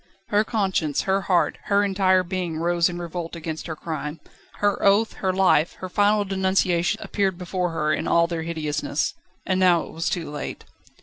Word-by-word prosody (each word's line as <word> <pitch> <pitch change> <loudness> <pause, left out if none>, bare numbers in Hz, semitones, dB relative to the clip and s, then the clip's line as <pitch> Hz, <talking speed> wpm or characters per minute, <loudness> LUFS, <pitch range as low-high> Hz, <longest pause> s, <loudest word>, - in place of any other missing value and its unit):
Her 210 +1 +3
conscience, 190 - 0
her 195 +1 +1
heart, 175 -2 +2
her 200 0 +3
entire 190 -2 +3
being 180 -3 -3
rose 170 +1 +2
in 175 - -5
revolt 170 0 -5
against 160 0 -5
her 160 - -4
crime. 155 -1 -5 0.3
Her 205 -1 0
oath, 205 +3 +4
her 190 - 0
life, 185 -4 +3
her 185 - -8
final 205 +2 +2
denunciation 190 0 +1
appeared 195 -3 -1
before 180 0 -2
her 155 -2 0
in - - -2
all 170 0 +4
their 170 -1 -3
hideousness. 160 -3 -2 0.3
And 185 0 +1
now 180 -3 +4
it - - -10
was 165 +1 -2
too 165 -5 -3
late. 150 - -6
180 Hz, 180 wpm, -24 LUFS, 165-195 Hz, 0.3 s, oath